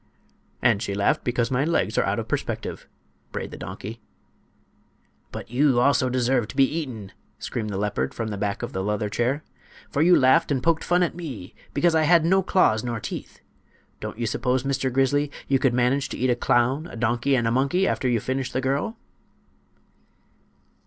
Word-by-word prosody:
"And 115 Hz, -5 st, +3 dB
she 100 Hz, -4 st, -3 dB
laughed 100 Hz, 0 st, +1 dB
because 120 Hz, 0 st, 0 dB
my 130 Hz, +1 st, +2 dB
legs 170 Hz, +3 st, 0 dB
are -, -, +3 dB
out -, -, 0 dB
of -, -, -3 dB
perspective," -, -, -4 dB, 0.4 s
brayed -, -, -5 dB
the -, -, -7 dB
donkey. 110 Hz, +3 st, -7 dB, 1.3 s
"But -, -, -8 dB
you 130 Hz, 0 st, +3 dB
also 130 Hz, 0 st, +3 dB
deserve 125 Hz, -2 st, +1 dB
to -, -, -10 dB
be 135 Hz, -, +5 dB
eaten," 130 Hz, -9 st, -3 dB, 0.3 s
screamed 110 Hz, -2 st, -4 dB
the 100 Hz, -, -3 dB
leopard 100 Hz, -10 st, -1 dB
from 115 Hz, -1 st, -3 dB
the 105 Hz, -, -4 dB
back 100 Hz, 0 st, -2 dB
of -, -, -5 dB
the 95 Hz, -, -2 dB
leather 105 Hz, +1 st, -1 dB
chair; 125 Hz, +8 st, -1 dB, 0.5 s
"for 145 Hz, -, 0 dB
you 175 Hz, +2 st, +6 dB
laughed 140 Hz, +5 st, +4 dB
and 130 Hz, -3 st, 0 dB
poked 165 Hz, -1 st, +2 dB
fun 180 Hz, +1 st, +2 dB
at 175 Hz, -, -1 dB
me 135 Hz, -, -7 dB, 0.2 s
because 175 Hz, -1 st, +3 dB
I 160 Hz, -, +3 dB
had 165 Hz, 0 st, +5 dB
no 190 Hz, +3 st, +4 dB
claws 145 Hz, -, +2 dB
nor 120 Hz, -2 st, -3 dB
teeth! -, -, -7 dB, 0.6 s
Don't -, -, -6 dB
you 120 Hz, -, -2 dB
suppose 125 Hz, +3 st, 0 dB
Mr. 135 Hz, -1 st, -1 dB
Grizzly, 140 Hz, +3 st, +2 dB, 0.2 s
you 135 Hz, -1 st, +2 dB
could 130 Hz, -2 st, +2 dB
manage 125 Hz, +3 st, +1 dB
to -, -, -5 dB
eat 130 Hz, +1 st, +1 dB
a -, -, +2 dB
clown, 125 Hz, +6 st, +1 dB
a -, -, -10 dB
donkey 120 Hz, +4 st, +1 dB
and 120 Hz, -3 st, +1 dB
a -, -, +1 dB
monkey 140 Hz, +10 st, +2 dB
after 130 Hz, -, 0 dB
you 120 Hz, -2 st, +2 dB
finish 130 Hz, +3 st, -3 dB
the -, -, -1 dB
girl?" 140 Hz, -, -1 dB
130 Hz, 195 wpm, -24 LUFS, 115-145 Hz, 1.3 s, you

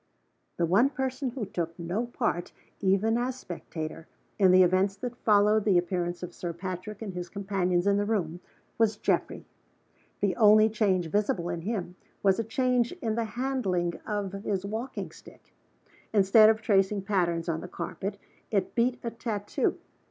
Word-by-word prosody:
The 170 Hz, -, +2 dB
one 200 Hz, +11 st, +4 dB
person 265 Hz, -1 st, -2 dB
who 245 Hz, -3 st, -4 dB
took 170 Hz, -3 st, -4 dB
no 180 Hz, +8 st, -2 dB
part, 175 Hz, -7 st, -2 dB, 0.3 s
even 205 Hz, +4 st, +2 dB
as 250 Hz, +1 st, -1 dB
spectator, 165 Hz, -7 st, -7 dB, 0.3 s
in 190 Hz, -2 st, +6 dB
the 185 Hz, 0 st, +7 dB
events 185 Hz, +2 st, +2 dB
that 245 Hz, +2 st, -5 dB
followed 210 Hz, -1 st, +3 dB
the 200 Hz, -4 st, +4 dB
appearance 175 Hz, 0 st, -1 dB
of 175 Hz, -1 st, -6 dB
Sir 175 Hz, -1 st, -5 dB
Patrick 185 Hz, +4 st, -6 dB
and 200 Hz, -4 st, -5 dB
his 180 Hz, -1 st, -5 dB
companions 190 Hz, -3 st, 0 dB
in 200 Hz, 0 st, +3 dB
the 205 Hz, -, +1 dB
room 180 Hz, -6 st, -1 dB, 0.4 s
was 220 Hz, -2 st, +3 dB
Geoffrey. -, -, -1 dB, 0.7 s
The 195 Hz, -3 st, +1 dB
only 215 Hz, 0 st, +6 dB
change 200 Hz, -5 st, +1 dB
visible 200 Hz, -4 st, 0 dB
in 170 Hz, -1 st, -3 dB
him 180 Hz, -2 st, -4 dB, 0.3 s
was 195 Hz, 0 st, +3 dB
a -, -, +1 dB
change 245 Hz, -, +1 dB
in 240 Hz, -12 st, -3 dB
the 230 Hz, +1 st, -1 dB
handling 200 Hz, -10 st, 0 dB
of 205 Hz, -3 st, -2 dB
his 195 Hz, -2 st, -2 dB
walking 225 Hz, +6 st, -4 dB
stick. -, -, -17 dB, 0.6 s
Instead 215 Hz, +1 st, +6 dB
of 220 Hz, 0 st, +1 dB
tracing 195 Hz, -2 st, +2 dB
patterns 175 Hz, -4 st, 0 dB
on 160 Hz, -1 st, -1 dB
the -, -, -7 dB
carpet, 195 Hz, +2 st, -5 dB, 0.3 s
it 200 Hz, -3 st, 0 dB
beat 245 Hz, +1 st, +1 dB
a 235 Hz, -, -3 dB
tattoo. 215 Hz, -3 st, -2 dB
200 Hz, 165 wpm, -28 LUFS, 180-225 Hz, 0.7 s, the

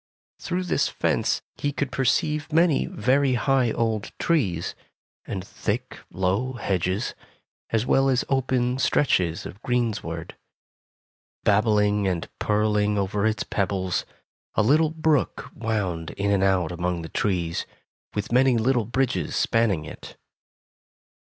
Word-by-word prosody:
Through 180 Hz, +1 st, -2 dB
this 180 Hz, -, +1 dB
fence -, -, 0 dB
he 145 Hz, -, -1 dB
could 140 Hz, -1 st, -3 dB
perceive 150 Hz, +4 st, 0 dB
many 165 Hz, -1 st, +3 dB
very 130 Hz, +4 st, +2 dB
high 130 Hz, 0 st, +2 dB
old 110 Hz, -3 st, -1 dB
trees 100 Hz, -, 0 dB, 0.5 s
and 95 Hz, -1 st, -5 dB
thick, 120 Hz, +5 st, -4 dB
low 95 Hz, +8 st, 0 dB
hedges, 95 Hz, -2 st, -1 dB, 0.6 s
as 115 Hz, +1 st, +1 dB
well 135 Hz, +1 st, +3 dB
as 130 Hz, -2 st, +1 dB
open 130 Hz, -1 st, +1 dB
stretches 90 Hz, -, +1 dB
of 100 Hz, -, -9 dB
greensward. 110 Hz, -9 st, -2 dB, 1.1 s
Babbling 105 Hz, -1 st, +3 dB
and 90 Hz, -3 st, -1 dB
purling 105 Hz, -1 st, +1 dB
over 100 Hz, +2 st, 0 dB
its 110 Hz, -2 st, 0 dB
pebbles, 95 Hz, -2 st, -1 dB, 0.5 s
a -, -, +3 dB
little 150 Hz, +7 st, +4 dB
brook 160 Hz, -3 st, 0 dB
wound 100 Hz, -8 st, -2 dB
in 100 Hz, 0 st, 0 dB
and 100 Hz, -1 st, +2 dB
out 95 Hz, -4 st, +2 dB
among 85 Hz, 0 st, -2 dB
the 80 Hz, -, -7 dB
trees, 85 Hz, -5 st, -1 dB, 0.5 s
with 105 Hz, +1 st, -3 dB
many 125 Hz, 0 st, +4 dB
little 120 Hz, 0 st, +2 dB
bridges 120 Hz, -, -1 dB
spanning 105 Hz, -9 st, +1 dB
it. -, -, -10 dB
110 Hz, 125 wpm, -25 LUFS, 95-130 Hz, 1.1 s, little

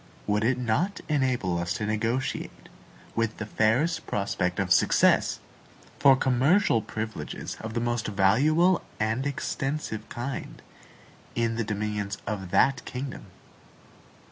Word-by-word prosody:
Would 105 Hz, +1 st, +1 dB
it 125 Hz, +3 st, +2 dB
not 125 Hz, -, 0 dB
enable 130 Hz, -, +1 dB
us 85 Hz, 0 st, -1 dB
to 105 Hz, -, -3 dB
negotiate, 115 Hz, +5 st, -2 dB, 0.5 s
with 115 Hz, -1 st, 0 dB
the 110 Hz, -, -4 dB
fairest 115 Hz, +11 st, +1 dB
prospect 90 Hz, -3 st, -1 dB
of 95 Hz, -2 st, +3 dB
success, -, -, +3 dB, 0.6 s
for 140 Hz, -2 st, +7 dB
commercial 130 Hz, -, +3 dB
privileges 110 Hz, 0 st, -5 dB
of 110 Hz, +1 st, -6 dB
the 120 Hz, -, 0 dB
most 120 Hz, -1 st, -1 dB
valuable 145 Hz, -, +3 dB, 0.2 s
and 110 Hz, +5 st, 0 dB
extensive 135 Hz, -5 st, -3 dB
kind, 130 Hz, +3 st, -5 dB, 0.7 s
in 115 Hz, -1 st, 0 dB
the 115 Hz, -, -1 dB
dominions 105 Hz, -1 st, -3 dB
of 100 Hz, -3 st, -4 dB
that 135 Hz, +8 st, +3 dB
kingdom? 130 Hz, -4 st, -6 dB
115 Hz, 120 wpm, -27 LUFS, 105-135 Hz, 0.7 s, for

